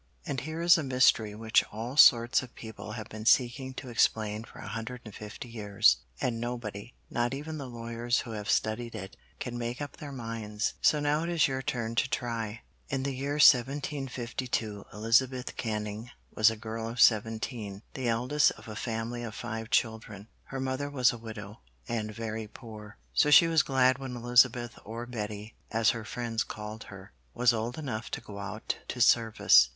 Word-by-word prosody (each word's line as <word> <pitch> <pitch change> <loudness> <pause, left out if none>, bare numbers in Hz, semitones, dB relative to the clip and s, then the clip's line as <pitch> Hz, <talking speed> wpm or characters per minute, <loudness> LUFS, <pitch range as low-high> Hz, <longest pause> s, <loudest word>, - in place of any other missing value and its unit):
And 140 -3 -2
here 155 +3 -4
is 170 0 +7
a - - -2
mystery 125 -5 +3
which 110 +1 +3
all 115 +5 -5
sorts 120 -5 +7
of 130 -2 -11
people 110 -1 -8
have 110 -2 -6
been 110 +1 -7
seeking 130 +1 +3
to 135 - -7
explain 110 -2 +1
for - - -15
a - - -8
hundred 115 +2 -5
and 105 - -9
fifty 105 +4 -8
years, 105 -4 +3 0.2
and 115 -2 -1
nobody, 120 -2 -5 0.2
not 120 +2 0
even 155 +2 -6
the 135 -2 -6
lawyers 115 0 -1
who 120 - -8
have 105 0 -5
studied 115 +1 0
it, 95 +1 -7 0.2
can 120 -1 -4
make 120 +1 -3
up 145 -1 -6
their 145 -2 -7
minds. 115 -4 -3
So 150 - +4
now 145 +1 +1
it 170 - -2
is 170 -2 +3
your 130 -1 -2
turn 115 -3 -2
to 130 +3 +1
try. 115 -2 -3 0.3
In 135 -3 -1
the 140 0 -1
year 140 +2 -2
1752 130 -6 +2
Elizabeth 125 +4 +1
Canning 105 0 -4 0.2
was 110 0 +6
a 110 - -4
girl 110 +1 -5
of 120 +1 -7
seventeen, 110 -2 +2
the 130 -2 -3
eldest 125 +6 +3
of - - -15
a 110 - -7
family 115 +1 -3
of 115 -2 -6
five 115 -1 -5
children. 110 -4 -1 0.2
Her 135 - -6
mother 130 +2 -2
was 130 -4 +3
a - - -6
widow 110 -1 -8 0.3
and 110 -3 -2
very 110 0 -5
poor, 110 -2 -11 0.2
so 150 - +4
she 150 - +9
was 165 -2 +4
glad 130 -1 +3
when 130 -2 -5
Elizabeth 120 0 +3
or 115 +3 -6
Betty, 105 -2 -5 0.2
as 110 -1 +3
her 115 -3 -5
friends 115 -1 -2
called 105 +1 -7
her, 100 0 -11 0.2
was 125 0 +4
old 115 +4 -3
enough 120 -8 -4
to - - -4
go 100 -1 -9
out 105 +2 -4
to 125 - -5
service. 110 - +5
115 Hz, 185 wpm, -29 LUFS, 110-130 Hz, 0.3 s, she